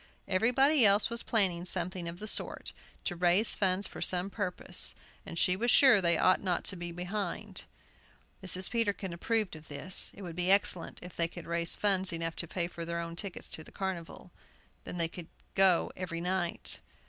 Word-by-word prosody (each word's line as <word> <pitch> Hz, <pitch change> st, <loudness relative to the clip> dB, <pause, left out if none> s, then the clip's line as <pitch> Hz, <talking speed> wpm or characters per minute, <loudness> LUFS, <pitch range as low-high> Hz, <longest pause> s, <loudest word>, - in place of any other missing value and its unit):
Everybody 250 Hz, +9 st, +3 dB
else 205 Hz, +2 st, +5 dB
was 235 Hz, 0 st, -1 dB
planning 190 Hz, -7 st, +1 dB
something 180 Hz, -1 st, 0 dB
of 170 Hz, +1 st, -6 dB
the 215 Hz, -, -7 dB
sort, -, -, -1 dB, 0.3 s
to 175 Hz, -, -2 dB
"raise 180 Hz, +5 st, +4 dB
funds" 190 Hz, 0 st, +1 dB
for -, -, -6 dB
some 185 Hz, +2 st, +1 dB
purpose, 185 Hz, -4 st, -1 dB, 0.3 s
and 165 Hz, -, -7 dB
she 180 Hz, +2 st, +3 dB
was 235 Hz, +6 st, -1 dB
sure 245 Hz, -6 st, +7 dB
they 170 Hz, -2 st, +3 dB
ought 185 Hz, -, +3 dB
not 180 Hz, -3 st, -1 dB
to 195 Hz, -, +1 dB
be 175 Hz, -1 st, -6 dB
behindhand. 180 Hz, +4 st, -5 dB, 0.8 s
Mrs. 185 Hz, 0 st, +3 dB
Peterkin 205 Hz, -6 st, -1 dB
approved 215 Hz, +1 st, -1 dB
of 155 Hz, 0 st, -13 dB
this. 165 Hz, +5 st, 0 dB
It 200 Hz, -, -10 dB
would 170 Hz, -3 st, -7 dB
be 180 Hz, +1 st, 0 dB
excellent 190 Hz, -3 st, +2 dB
if 180 Hz, -, -10 dB
they 170 Hz, -, +1 dB
could 170 Hz, 0 st, -10 dB
raise 170 Hz, 0 st, -2 dB
funds 195 Hz, -2 st, +3 dB
enough 165 Hz, 0 st, -3 dB
to 170 Hz, -, -1 dB
pay 170 Hz, +1 st, -2 dB
for 170 Hz, -1 st, -7 dB
their 170 Hz, 0 st, -3 dB
own 170 Hz, 0 st, -5 dB
tickets 195 Hz, +1 st, -5 dB
to 160 Hz, -, -7 dB
the -, -, -14 dB
carnival; 185 Hz, -2 st, -6 dB, 0.5 s
then -, -, -6 dB
they 165 Hz, -1 st, +1 dB
could 170 Hz, 0 st, -10 dB, 0.3 s
go 190 Hz, -3 st, +4 dB
every 180 Hz, -2 st, -4 dB
night. 175 Hz, 0 st, -2 dB
180 Hz, 190 wpm, -31 LUFS, 170-200 Hz, 0.8 s, sure